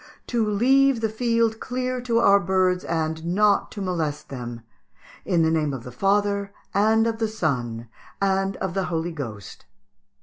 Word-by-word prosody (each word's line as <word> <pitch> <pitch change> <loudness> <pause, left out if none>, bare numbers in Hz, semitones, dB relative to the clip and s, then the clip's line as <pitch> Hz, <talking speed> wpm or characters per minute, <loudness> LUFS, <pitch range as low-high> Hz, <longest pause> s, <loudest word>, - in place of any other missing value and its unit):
to 235 -2 0
leave 265 +4 +4
the 220 -1 0
field 230 0 +1
clear 255 0 -3
to 240 -2 0
our 200 -3 +6
birds, 185 -1 +1
and 160 -1 -2
not 200 +4 +2
to 205 - -5
molest 160 -5 -3
them: 120 -3 -6 0.6
in 175 -4 +2
the 160 - +2
name 150 -3 0
of 120 - -8
the 125 - -9
Father, 200 - +1 0.2
and 220 +3 +3
of 225 -1 -1
the 225 - +1
Son, 125 - -2 0.3
and 195 0 0
of 190 -2 -3
the 195 -1 -1
Holy 170 0 -2
Ghost." 115 - -8
195 Hz, 165 wpm, -24 LUFS, 160-220 Hz, 0.6 s, our